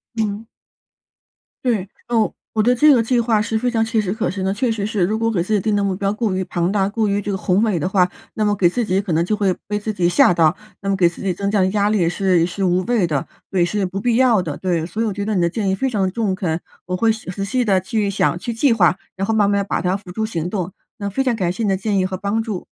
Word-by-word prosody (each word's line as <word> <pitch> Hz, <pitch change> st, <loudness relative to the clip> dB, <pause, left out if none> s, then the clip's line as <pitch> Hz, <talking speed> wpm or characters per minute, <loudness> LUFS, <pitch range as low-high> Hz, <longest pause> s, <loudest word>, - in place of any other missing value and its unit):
嗯。 215 Hz, -1 st, -2 dB, 1.2 s
对， 210 Hz, -6 st, 0 dB, 0.2 s
哦， 230 Hz, -3 st, +1 dB, 0.2 s
我 215 Hz, -2 st, +2 dB
对 245 Hz, +3 st, +4 dB
这 295 Hz, +4 st, +6 dB
个 240 Hz, -3 st, +3 dB
计 240 Hz, +2 st, +1 dB
划 225 Hz, -2 st, +2 dB
是 220 Hz, +1 st, -1 dB
非 250 Hz, +2 st, 0 dB
常 225 Hz, -2 st, +1 dB
切 225 Hz, 0 st, 0 dB
实 195 Hz, -3 st, -1 dB
可 220 Hz, -, -1 dB
行 190 Hz, +1 st, -3 dB
的。 190 Hz, -, +1 dB
确 235 Hz, +4 st, 0 dB
实 210 Hz, -3 st, -2 dB
是， 210 Hz, -3 st, 0 dB
如 215 Hz, +5 st, 0 dB
果 225 Hz, 0 st, +1 dB
给 190 Hz, -7 st, 0 dB
自 215 Hz, -, -2 dB
己 210 Hz, -, +3 dB
定 210 Hz, +2 st, 0 dB
的 205 Hz, -, +1 dB
目 195 Hz, -1 st, 0 dB
标 195 Hz, +1 st, -1 dB
过 215 Hz, -2 st, -1 dB
于 185 Hz, -, -1 dB
庞 175 Hz, 0 st, -1 dB
大， 195 Hz, -1 st, +1 dB
过 220 Hz, +2 st, -1 dB
于 200 Hz, 0 st, 0 dB
这 205 Hz, -, -5 dB
个 190 Hz, -, -1 dB
宏 185 Hz, +2 st, +1 dB
伟 215 Hz, -5 st, +1 dB
的 160 Hz, -, -1 dB
话， 185 Hz, -2 st, +3 dB, 0.3 s
那 215 Hz, -, 0 dB
么 205 Hz, 0 st, +2 dB
给 185 Hz, -3 st, +3 dB
自 240 Hz, +6 st, -1 dB
己 190 Hz, 0 st, +1 dB
可 200 Hz, -3 st, -5 dB
能 165 Hz, +1 st, +2 dB
就 215 Hz, -, 0 dB
会 200 Hz, -3 st, +1 dB
被 210 Hz, -, -1 dB
自 210 Hz, +1 st, -3 dB
己 180 Hz, -4 st, +1 dB
吓 175 Hz, 0 st, +5 dB
到， 165 Hz, -2 st, +3 dB, 0.3 s
那 195 Hz, -, -3 dB
么 195 Hz, -, +2 dB
给 180 Hz, -3 st, +4 dB
自 170 Hz, -, -12 dB
己 195 Hz, -2 st, 0 dB
增 200 Hz, +2 st, -2 dB
加 210 Hz, -, +2 dB
的 185 Hz, -, +3 dB
压 205 Hz, 0 st, +2 dB
力 215 Hz, -, +2 dB
也 175 Hz, -4 st, +2 dB
是 180 Hz, -1 st, +2 dB
是 190 Hz, +3 st, -4 dB
无 180 Hz, 0 st, +2 dB
谓 235 Hz, -6 st, +2 dB
的 150 Hz, -5 st, -2 dB, 0.2 s
对， 180 Hz, -3 st, +2 dB
是 200 Hz, +2 st, -1 dB
不 190 Hz, +2 st, -4 dB
必 235 Hz, +2 st, +1 dB
要 240 Hz, -5 st, +4 dB
的。 155 Hz, -5 st, -4 dB
对， 175 Hz, -4 st, -1 dB
所 215 Hz, +6 st, -3 dB
以 -, -, 0 dB
我 215 Hz, -, -1 dB
觉 200 Hz, +1 st, -4 dB
得 215 Hz, 0 st, -1 dB
你 180 Hz, -, +2 dB
的 170 Hz, -, +2 dB
建 200 Hz, +2 st, -2 dB
议 190 Hz, -, +1 dB
非 265 Hz, +7 st, -1 dB
常 200 Hz, -6 st, 0 dB
中 205 Hz, 0 st, -1 dB
肯， 175 Hz, -3 st, -2 dB, 0.2 s
我 180 Hz, +1 st, -2 dB
会 225 Hz, +4 st, +3 dB
细 220 Hz, -3 st, -6 dB
仔 195 Hz, +2 st, -4 dB
细 245 Hz, +5 st, 0 dB
地 195 Hz, -3 st, +3 dB
去 210 Hz, +1 st, -1 dB
想， 190 Hz, -3 st, 0 dB
去 235 Hz, +6 st, -4 dB
计 245 Hz, +4 st, +2 dB
划， 180 Hz, -7 st, +4 dB, 0.2 s
然 195 Hz, -, -1 dB
后 225 Hz, -, 0 dB
慢 210 Hz, -2 st, +3 dB
慢 200 Hz, -1 st, +1 dB
把 -, -, -1 dB
它 180 Hz, +2 st, 0 dB
付 195 Hz, -3 st, -12 dB
诸 220 Hz, +3 st, -1 dB
行 175 Hz, -6 st, -3 dB
动。 185 Hz, -2 st, -3 dB, 0.3 s
那 200 Hz, -, -2 dB
非 235 Hz, +7 st, -1 dB
常 250 Hz, -3 st, +1 dB
感 180 Hz, -5 st, 0 dB
谢 225 Hz, +5 st, -4 dB
你 210 Hz, -, +1 dB
的 195 Hz, -, +2 dB
建 200 Hz, +1 st, -1 dB
议 185 Hz, -, +2 dB
和 185 Hz, 0 st, -3 dB
帮 200 Hz, +4 st, -1 dB
助。 215 Hz, -5 st, -5 dB
200 Hz, 325 characters per minute, -20 LUFS, 185-220 Hz, 1.2 s, 这